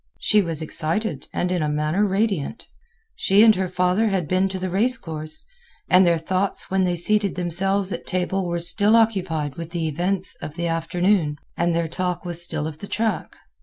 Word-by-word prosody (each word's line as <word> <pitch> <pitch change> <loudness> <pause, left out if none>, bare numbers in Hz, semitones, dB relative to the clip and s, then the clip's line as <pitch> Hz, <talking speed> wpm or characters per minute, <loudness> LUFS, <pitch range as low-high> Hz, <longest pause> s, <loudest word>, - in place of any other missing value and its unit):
She 210 -1 +3
was 165 -4 -3
excited 160 +1 -2
and 180 - -1
in 180 -2 0
a 150 - 0
manner 150 +6 0
radiant. 195 -5 -1 0.5
She 200 +3 +4
and 225 -1 +7
her 185 -1 -2
father 180 +4 +1
had 190 -6 -1
been 185 +3 +1
to 190 - -4
the 185 -1 -4
race 240 +7 +1
course, 155 -7 -4 0.4
and 185 0 +6
their 170 -1 +3
thoughts 185 +5 -1
when 190 -1 +2
they 175 -1 0
seated 200 +3 +2
themselves 190 +3 0
at 170 - -7
table 185 0 -1
were 175 0 -1
still 205 +5 +5
occupied 185 -10 +1
with 165 -1 -6
the 170 -2 -2
events 180 +5 0
of 150 - -7
the 170 0 -3
afternoon, 165 -1 0 0.2
and 170 0 0
their 170 -1 0
talk 180 +1 -3
was 175 -1 -1
still 160 -3 -2
of 155 -1 -6
the 200 - -8
track. 220 -5 -2
180 Hz, 195 wpm, -22 LUFS, 165-195 Hz, 0.5 s, and